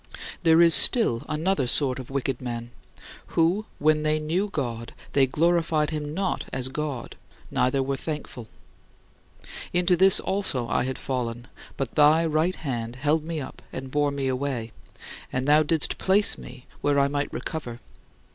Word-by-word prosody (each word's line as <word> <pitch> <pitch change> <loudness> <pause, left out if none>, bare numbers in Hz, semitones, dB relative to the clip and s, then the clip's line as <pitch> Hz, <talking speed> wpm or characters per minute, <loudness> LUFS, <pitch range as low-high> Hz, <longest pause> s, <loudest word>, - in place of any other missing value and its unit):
There 165 -1 +5
is 165 -1 +6
still 155 - +5
another 155 -3 0
sort 130 +1 +4
of 130 - -9
wicked 135 -1 -3
men, 120 -1 -6 0.7
who 175 +6 +2
"when 155 +1 +2
they 155 0 +1
knew 175 +7 -1
God, 120 -9 -5 0.2
they 135 -2 +4
glorified 160 +1 +1
him 150 -1 -4
not 190 0 -2
as 130 -1 0
God, 140 -3 -5 0.4
neither 135 +2 +1
were 135 0 -2
thankful." 145 -6 -7 1.3
Into 180 0 +3
this 190 +2 +6
also 190 -11 -2
I 120 - 0
had 130 0 -4
fallen, 120 -2 -4 0.3
but 135 -4 -4
thy 155 +2 +4
right 160 +4 0
hand 120 -5 -5
held 150 +4 0
me 165 0 -4
up 130 - -9
and 130 0 -7
bore 145 0 +1
me 140 -1 -3
away, 130 -3 -3 0.6
and 130 +2 -2
thou 150 +1 +5
didst 155 0 +2
place 200 +2 +3
me 125 0 -12 0.2
where 145 -1 +1
I 140 - +3
might 145 0 -3
recover. 125 -7 -6
145 Hz, 155 wpm, -25 LUFS, 130-160 Hz, 1.3 s, is